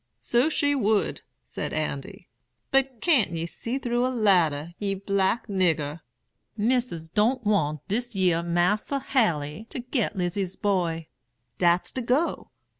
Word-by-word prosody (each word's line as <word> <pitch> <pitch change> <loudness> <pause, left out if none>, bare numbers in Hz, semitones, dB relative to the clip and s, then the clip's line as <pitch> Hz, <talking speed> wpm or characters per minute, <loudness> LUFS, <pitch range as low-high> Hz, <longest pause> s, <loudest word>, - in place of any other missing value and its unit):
"'So 245 +6 +2
she 285 -2 +1
would,' 220 -6 +1 0.2
said - - -5
Andy; - - -4 0.4
'but 270 -3 +1
can't 270 - +3
ye 165 0 -2
see 230 +8 -4
through 245 -2 0
a 255 - +2
ladder, 175 - +2
ye 200 -1 -1
black 195 +3 0
nigger? 170 -7 0 0.6
Missis 225 -7 0
don't 225 +8 +1
want 155 -8 0
dis 235 +3 -2
yer 180 -3 +2
Mas'r 175 +10 +1
Haley 215 - 0
to - - -6
get 245 -3 -1
Lizy's 185 0 -2
boy; 175 -5 0 0.5
dat's 175 0 +3
de 260 - -3
go. 255 +8 0
205 Hz, 135 wpm, -26 LUFS, 170-245 Hz, 0.6 s, can't